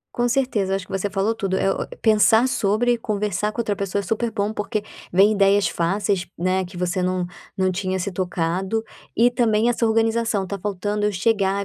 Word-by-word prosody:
Com 240 0 +1
certeza, 235 -7 0
eu - - +3
acho 195 -1 -4
que - - -14
você 200 +1 -1
falou 195 +4 0
tudo. 195 -4 -2
Eh, 195 - +2
o - - -3
pensar 220 +2 +4
sobre 235 +1 +1
conversar 210 -1 -1
com 235 - -2
outra 210 -2 -1
pessoa 200 0 -2
é - - -3
super 230 +2 -1
bom 210 -1 -2
porque 210 0 -3 0.3
vem 195 +4 +5
ideias 200 0 +3
fáceis, 190 +2 -1
né, 185 +2 +1
que 180 0 -11
você 180 +1 -1
não 180 0 0 0.3
não 185 0 +2
tinha 185 0 -2
se 190 +2 -3
tocado. 185 +4 -1 0.3
E 240 +2 +5
também 230 -1 +2
essa 230 -1 +1
organização, 225 -2 +1
tá 200 +1 -5
faltando 205 +1 -1
eu - - 0
chegar 200 0 +1
205 Hz, 200 wpm, -22 LUFS, 190-220 Hz, 0.3 s, vem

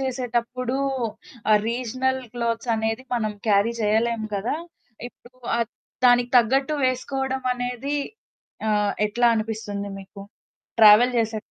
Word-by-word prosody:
చేసేటప్పుడు 250 -1 -2 0.7
ఆ - - +7
regional 255 +2 -1
clothes 235 0 -2
అనేది 225 +2 -2
మనం 215 -3 -1
క్యారీ 205 +2 +3
చేయలేం 220 +2 +1
కదా! 200 +6 -1 0.5
ఇప్పుడు 245 +1 -21 0.7
దానికి 245 0 +4
తగ్గట్టు 270 +6 +2
వేసుకోవడమనేది 255 0 -2 0.7
ఆహ్, 210 -1 +2
ఎట్లా 240 +3 +1
అనిపిస్తుంది 215 -2 -3
మీకు 195 +1 -12 0.6
ట్రావెల్ 220 +3 +8
చేసే 225 -1 0
235 Hz, 100 wpm, -24 LUFS, 220-255 Hz, 0.7 s, ట్రావెల్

